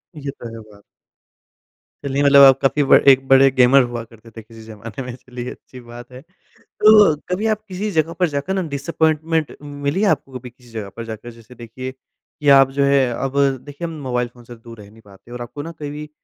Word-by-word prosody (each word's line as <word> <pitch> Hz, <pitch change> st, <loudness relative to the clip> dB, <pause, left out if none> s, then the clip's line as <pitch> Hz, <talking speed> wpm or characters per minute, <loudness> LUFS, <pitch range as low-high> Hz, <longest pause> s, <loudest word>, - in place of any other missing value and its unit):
ये 140 Hz, -2 st, -6 dB
तो 120 Hz, -, -8 dB
है -, -, -9 dB
बात। 100 Hz, 0 st, -19 dB, 1.2 s
चलिए, 140 Hz, +1 st, -1 dB
मतलब 140 Hz, 0 st, +6 dB
आप 135 Hz, -1 st, +6 dB
काफ़ी 140 Hz, +2 st, +1 dB
ब 135 Hz, -, +3 dB, 0.2 s
एक 135 Hz, 0 st, +4 dB
बड़े 135 Hz, 0 st, +6 dB
गेमर 130 Hz, +1 st, +5 dB
हुआ 120 Hz, -1 st, -5 dB
करते 115 Hz, 0 st, -18 dB
थे 115 Hz, -, -11 dB
किसी 110 Hz, +1 st, -15 dB
ज़माने 110 Hz, +4 st, -9 dB
में 125 Hz, -1 st, -7 dB
चलिए 125 Hz, -1 st, -8 dB
अच्छी 130 Hz, -, -14 dB
बात 120 Hz, +1 st, -12 dB
है। 130 Hz, +1 st, -11 dB, 0.4 s
तो 210 Hz, -6 st, +4 dB
कभी 185 Hz, +5 st, -2 dB
आप 215 Hz, -1 st, -1 dB
किसी 200 Hz, +2 st, -4 dB
जगह 160 Hz, -1 st, 0 dB
पर 180 Hz, -, +3 dB
जाकर 145 Hz, +6 st, -3 dB
ना 190 Hz, -, -1 dB
डिसअपॉइंटमेंट 160 Hz, +1 st, -1 dB
मिली 145 Hz, +4 st, -3 dB
है, 215 Hz, -, +2 dB
आपको 130 Hz, -2 st, -2 dB
कभी 125 Hz, 0 st, -11 dB
किसी 120 Hz, 0 st, -22 dB
जगह 110 Hz, -3 st, -7 dB
पर 115 Hz, -, -6 dB
जाकर? 110 Hz, +1 st, -8 dB
जैसे 115 Hz, +1 st, -17 dB
देखिए 120 Hz, +2 st, -8 dB
कि 140 Hz, +2 st, -7 dB
आप 135 Hz, -1 st, +6 dB
जो 140 Hz, +1 st, 0 dB
है 140 Hz, -1 st, +3 dB
अब 135 Hz, +3 st, -4 dB, 0.3 s
देखिए 145 Hz, +4 st, -7 dB
हम 165 Hz, -, -8 dB
मोबाइल 125 Hz, -2 st, -2 dB
फ़ोन 120 Hz, -1 st, -17 dB
से 120 Hz, 0 st, -12 dB
दूर 115 Hz, 0 st, -14 dB
रह 100 Hz, -, -14 dB
नहीं 110 Hz, +1 st, -19 dB
पाते 100 Hz, +4 st, -18 dB
और 120 Hz, -, -7 dB
आपको 120 Hz, +4 st, -8 dB
ना 165 Hz, +2 st, -7 dB
कभी 150 Hz, +1 st, -7 dB
135 Hz, 220 wpm, -19 LUFS, 120-145 Hz, 1.2 s, मतलब